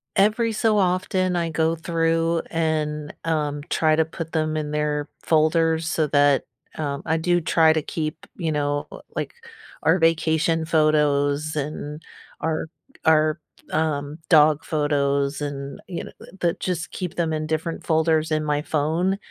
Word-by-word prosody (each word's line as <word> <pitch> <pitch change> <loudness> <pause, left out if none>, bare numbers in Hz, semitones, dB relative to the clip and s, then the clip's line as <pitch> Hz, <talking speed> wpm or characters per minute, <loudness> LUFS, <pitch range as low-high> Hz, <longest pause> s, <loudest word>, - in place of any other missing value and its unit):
Every 220 +3 +3
so 215 0 +2
often, 185 -1 +1
I 170 -1 0
go 160 +1 +1
through 165 0 +1
and, 155 -2 -1
um, 150 -3 -1
try 155 -1 +3
to 160 - +3
put 160 0 -7
them 155 -1 0
in 150 -1 -3
their 150 -1 -1 0.2
folders 160 0 +2
so 160 -2 +1
that 145 -1 +4 0.3
um, 140 -2 -3
I 160 - +1
do 175 +2 +2
try 160 0 +4
to 160 - 0
keep, 155 +1 -4
you 165 -3 -2
know, 145 -1 -1
l - - -10
like, - - -3 0.5
our 165 +4 +4
vacation 165 0 +2
photos 150 -1 +2
and 150 +1 -4 0.4
our 160 0 -1 0.4
our, 155 0 +4 0.3
um, 150 -1 -1
dog 155 -2 +5
photos 140 -2 0
and, 140 -1 -5
you 175 -3 -5
kno - - -9
uh, - - -10 0.2
that 170 -1 0
just 175 -3 -3
keep 180 -3 -5
them 165 -2 0
in 155 0 -2
different 160 +1 -2
folders 160 -1 +2
in 155 0 +1
my 150 -1 0
phone, 160 +6 0
160 Hz, 155 wpm, -23 LUFS, 150-165 Hz, 0.5 s, dog